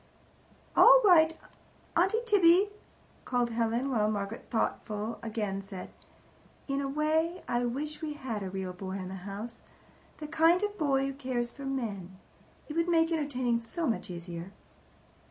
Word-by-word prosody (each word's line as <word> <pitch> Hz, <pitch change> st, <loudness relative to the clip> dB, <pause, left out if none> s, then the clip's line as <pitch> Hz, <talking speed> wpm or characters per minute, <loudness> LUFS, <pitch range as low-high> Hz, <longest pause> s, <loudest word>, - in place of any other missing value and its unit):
"All -, -, +9 dB
right, 325 Hz, -4 st, +6 dB, 0.6 s
Auntie 385 Hz, +7 st, +2 dB
Tibby," 395 Hz, -2 st, +5 dB, 0.5 s
called 245 Hz, -1 st, 0 dB
Helen, 235 Hz, +3 st, 0 dB
while 215 Hz, -4 st, +2 dB
Margaret, 205 Hz, +1 st, -4 dB
thoughtful 220 Hz, -1 st, -2 dB
again, 210 Hz, -3 st, -3 dB
said: 195 Hz, -1 st, -8 dB, 0.8 s
"In 275 Hz, 0 st, -1 dB
a 275 Hz, -, -2 dB
way, 315 Hz, +4 st, 0 dB
I 240 Hz, 0 st, 0 dB
wish 295 Hz, +5 st, -4 dB
we 310 Hz, -2 st, -3 dB
had 255 Hz, -7 st, -4 dB
a 190 Hz, -, -4 dB
real 190 Hz, -1 st, -4 dB
boy 190 Hz, +1 st, -6 dB
in 185 Hz, -1 st, -5 dB
the -, -, -6 dB, 0.2 s
house 210 Hz, +4 st, -6 dB, 0.6 s
the 305 Hz, -, -6 dB
kind 330 Hz, +4 st, +4 dB
of 415 Hz, 0 st, -1 dB
boy 275 Hz, -6 st, +1 dB
who 275 Hz, -, -3 dB
cares 255 Hz, -3 st, -2 dB
for 275 Hz, +2 st, -9 dB
men. 200 Hz, -9 st, -4 dB, 0.5 s
It 300 Hz, -, -6 dB
would 335 Hz, +1 st, +1 dB
make 330 Hz, -1 st, +3 dB
entertaining 255 Hz, -7 st, 0 dB
so 280 Hz, +9 st, -4 dB
much 225 Hz, -6 st, -1 dB
easier." 170 Hz, +1 st, -7 dB
255 Hz, 155 wpm, -30 LUFS, 210-320 Hz, 0.8 s, All